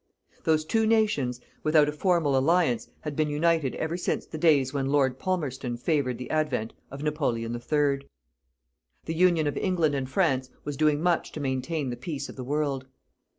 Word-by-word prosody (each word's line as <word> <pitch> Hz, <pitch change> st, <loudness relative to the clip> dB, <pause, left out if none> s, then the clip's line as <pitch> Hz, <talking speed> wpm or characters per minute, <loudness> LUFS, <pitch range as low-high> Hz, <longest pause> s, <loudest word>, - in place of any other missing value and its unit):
Those 155 Hz, -1 st, +2 dB
two 220 Hz, +6 st, +2 dB
nations, 210 Hz, -, +2 dB, 0.2 s
without 155 Hz, -1 st, +4 dB
a -, -, 0 dB
formal 155 Hz, -3 st, +1 dB
alliance, 145 Hz, -2 st, +2 dB
had 150 Hz, -2 st, -5 dB
been 155 Hz, 0 st, +1 dB
united 155 Hz, -2 st, +1 dB
ever 160 Hz, +2 st, -2 dB
since 180 Hz, -, -2 dB
the 155 Hz, -, -7 dB
days 145 Hz, -5 st, +3 dB
when 135 Hz, -2 st, -1 dB
Lord 135 Hz, -2 st, +2 dB
Palmerston 135 Hz, -9 st, -2 dB
favoured 130 Hz, -2 st, 0 dB
the 125 Hz, -, -7 dB
advent 145 Hz, -8 st, 0 dB, 0.2 s
of 140 Hz, +2 st, -7 dB
Napoleon 125 Hz, -7 st, -1 dB
III. 140 Hz, +3 st, 0 dB, 1.0 s
The 160 Hz, -, -2 dB
Union 170 Hz, -2 st, +3 dB
of 145 Hz, -, -1 dB
England 170 Hz, -6 st, +1 dB
and 135 Hz, -2 st, -2 dB
France 130 Hz, -1 st, +1 dB
was 145 Hz, -, -4 dB
doing 150 Hz, +1 st, +2 dB
much 175 Hz, -2 st, +1 dB
to -, -, -5 dB
maintain 135 Hz, +1 st, -2 dB
the 120 Hz, -, -5 dB
peace 145 Hz, -5 st, -5 dB
of -, -, -9 dB
the 130 Hz, -, -6 dB
world. 140 Hz, -1 st, -1 dB
145 Hz, 175 wpm, -27 LUFS, 130-160 Hz, 1.0 s, without